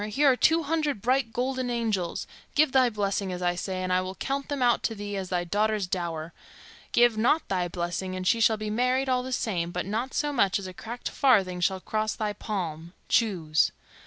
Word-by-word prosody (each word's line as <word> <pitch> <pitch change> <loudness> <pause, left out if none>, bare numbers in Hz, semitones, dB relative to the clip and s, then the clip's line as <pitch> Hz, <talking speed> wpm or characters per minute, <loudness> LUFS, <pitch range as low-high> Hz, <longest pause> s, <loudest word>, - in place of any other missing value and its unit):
Here 275 +6 +4
are - - +2
two 325 +5 +3
hundred 300 -5 0
bright 250 +2 +1
golden 255 +1 -1
angels; 220 -7 -1 0.3
give 300 -1 +4
thy 255 -2 +4
blessing, 200 -3 -1
as 180 0 -4
I 175 0 +2
say, 185 +1 -3
and 185 0 0
I 185 - +3
will 185 +1 -5
count 275 +5 -3
them 285 -3 -1
out 240 -1 +3
to 225 - -2
thee 205 0 -5
as 190 -2 -4
thy 180 -1 0
daughter's 210 +3 0
dower. 170 -3 -3 0.6
Give 240 -2 +4
not 275 +8 +2
thy 180 -2 0
blessing, 175 +2 -3
and 185 0 -4
she 230 +4 +3
shall 220 0 +4
be 215 0 -4
married 250 +4 +1
all 255 -1 +2
the 260 +1 -6
same, 185 -8 -1
but 175 +1 -3
not 225 +7 -3
so 295 -1 0
much 200 -7 +3
as 200 - -6
a 185 - -7
cracked 235 +6 -6
farthing 195 -10 +3
shall 190 +1 +1
cross 215 +2 -1
thy 210 -1 -2
palm. 170 -6 -5 0.2
Choose." 170 -9 +2
210 Hz, 215 wpm, -27 LUFS, 185-250 Hz, 0.6 s, Here